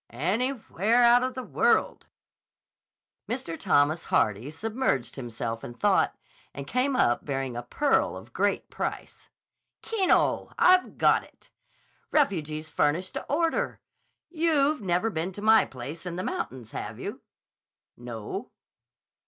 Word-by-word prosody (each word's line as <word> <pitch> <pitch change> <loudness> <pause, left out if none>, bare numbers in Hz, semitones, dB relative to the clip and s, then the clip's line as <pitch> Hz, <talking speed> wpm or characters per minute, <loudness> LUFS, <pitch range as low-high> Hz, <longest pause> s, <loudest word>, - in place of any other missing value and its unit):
"Anywhere 220 - +1
out 240 +1 +6
of 255 0 -2
the 255 - -4
world." - - +1 1.2
Mr. 230 -9 -3
Thomas 155 +2 +2
Harmon 105 +6 +1
submerged 210 - -2
himself 115 -2 -5
in 120 - -8
thought - - +2 0.4
and 140 - -6
came 255 - 0
up 120 - +2
bearing 135 -3 -3
a 120 - -3
pearl 275 - +1
of - - -13
great - - 0
price. - - -5 0.5
"Keno! 410 -5 +1
I've 365 0 +4
got - - +4
it. - - -22 0.6
Refuges 155 - 0
furnished 170 +6 0
to - - -5
order. 330 +2 0 0.5
You've 310 -4 +2
never 190 +3 0
been 165 +1 -2
to 205 - -8
my 220 0 +6
place 140 +8 -8
in 175 - -4
the 185 - -3
mountains, 130 - -5
have - - -6
you?" - - -6 0.7
"No." 115 -3 -6
180 Hz, 130 wpm, -27 LUFS, -, 1.2 s, out